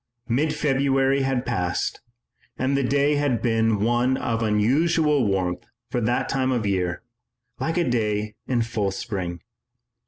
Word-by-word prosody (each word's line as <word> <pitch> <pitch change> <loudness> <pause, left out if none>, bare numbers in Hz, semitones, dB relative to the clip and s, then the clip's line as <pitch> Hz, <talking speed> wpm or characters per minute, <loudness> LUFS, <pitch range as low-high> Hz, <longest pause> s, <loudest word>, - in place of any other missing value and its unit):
Mid 150 +6 +1
February 135 -1 +2
had 135 -2 0
passed, 90 -7 -2 0.6
and 130 +2 0
the 140 - +2
day 140 +3 +2
had 140 -5 +1
been 115 -3 +1
one 120 +3 +2
of 115 -1 -2
unusual 140 +6 +2
warmth 90 -2 -1 0.2
for 125 - 0
that 120 +2 0
time 130 -1 0
of 120 -3 0
the 100 - 0
year, 90 -1 -1 0.6
like 165 +2 -1
a 175 - +2
day 105 -3 0
in 120 -3 +1
full 110 -3 -1
spring. 95 -4 -4
120 Hz, 150 wpm, -24 LUFS, 105-135 Hz, 0.6 s, February